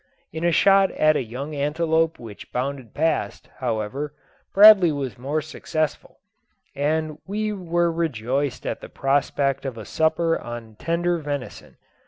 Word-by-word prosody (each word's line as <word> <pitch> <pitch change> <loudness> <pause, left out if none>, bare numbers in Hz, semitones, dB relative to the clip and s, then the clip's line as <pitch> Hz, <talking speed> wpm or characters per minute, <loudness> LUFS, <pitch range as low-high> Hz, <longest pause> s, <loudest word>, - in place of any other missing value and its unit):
In 160 +1 -4
a 175 - +3
shot 195 +3 +5
at 155 0 +3
a - - +1
young 130 +6 -6
antelope 160 +3 +1
which 110 -4 -11
bounded 130 -2 -4
past, 160 +2 -1
however, 130 +5 -3 0.4
Bradley 200 -4 +8
was 140 -4 -4
more 140 +5 -2
successful; 155 0 -3 0.6
and 155 +2 -1
we 210 +2 -2
were 175 -3 0
rejoiced 140 -4 -2
at - - -3
the - - -9
prospect 140 0 0
of 130 -4 -5
a 110 - -8
supper 165 +3 +1
on 115 -2 -8
tender 170 +1 0
venison. 145 -4 -6
150 Hz, 140 wpm, -23 LUFS, 135-165 Hz, 0.6 s, Bradley